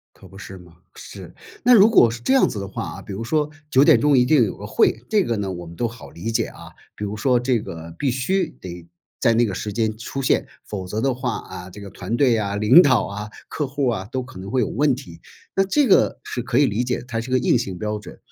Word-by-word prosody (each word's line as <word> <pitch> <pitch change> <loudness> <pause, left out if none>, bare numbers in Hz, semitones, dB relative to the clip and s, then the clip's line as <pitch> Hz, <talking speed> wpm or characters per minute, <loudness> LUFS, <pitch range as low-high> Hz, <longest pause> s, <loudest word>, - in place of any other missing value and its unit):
可 - - -16
不 95 - -15
是 95 0 -9
嘛？ 85 -2 -17 0.2
是。 - - -11 0.3
那 245 0 +6
如 210 0 +7
果 120 - +6
是 120 - -7
这 260 - +1
样 265 - +4
子 105 - -5
的 100 -1 -5
话 - - -6
啊， - - -9
比 - - -9
如 110 +4 -5
说 150 +3 0 0.2
9 135 -1 +5
点 - - +6
钟 145 -2 +4
一 125 - +5
定 130 -2 +4
有 105 - -4
个 105 - -8
会， 110 +2 +1
这 210 -2 +3
个 115 - -1
呢， 100 -2 -3
我 85 -1 -7
们 85 - -11
都 120 - 0
好 120 +3 -12
理 105 +7 -5
解 - - +1
啊， - - -12 0.3
比 105 - -5
如 105 +1 -4
说 125 +2 +2
这 125 -2 0
个 85 -4 -9
必 140 - 0
须 165 +8 0
得 85 -2 -9 0.3
在 115 - +4
那 120 +1 +4
个 95 - -4
时 105 +2 -4
间 110 -1 -1
出 115 +4 -6
现， 130 - +1 0.2
否 95 -3 -6
则 105 +4 -3
的 135 +1 +1
话， 125 -2 -3
啊， 90 0 -9
这 105 +3 -11
个 100 - -9
团 105 +7 -4
队 125 -4 +3
啊， 100 -1 -2
领 115 - +7
导 140 -5 +3
啊， 105 +1 -6 0.2
客 150 - -3
户 135 0 -1
啊， 110 -6 -2
都 130 0 -2
可 125 -6 -12
能 95 +1 -8
会 130 +3 +1
有 110 - 0
问 145 +2 +1
题， 120 -11 -11 0.3
那 195 - +3
这 275 +9 +2
个 195 - +3
是 120 - -4
可 125 0 0
以 145 - +5
理 110 +2 -1
解， 125 -1 -2
它 115 -3 -3
是 120 +3 -7
一 - - -4
个 130 - +4
硬 125 - +2
性 95 -6 -3
标 105 +1 -3
准。 105 - -12
115 Hz, 290 characters per minute, -22 LUFS, 100-130 Hz, 0.3 s, 如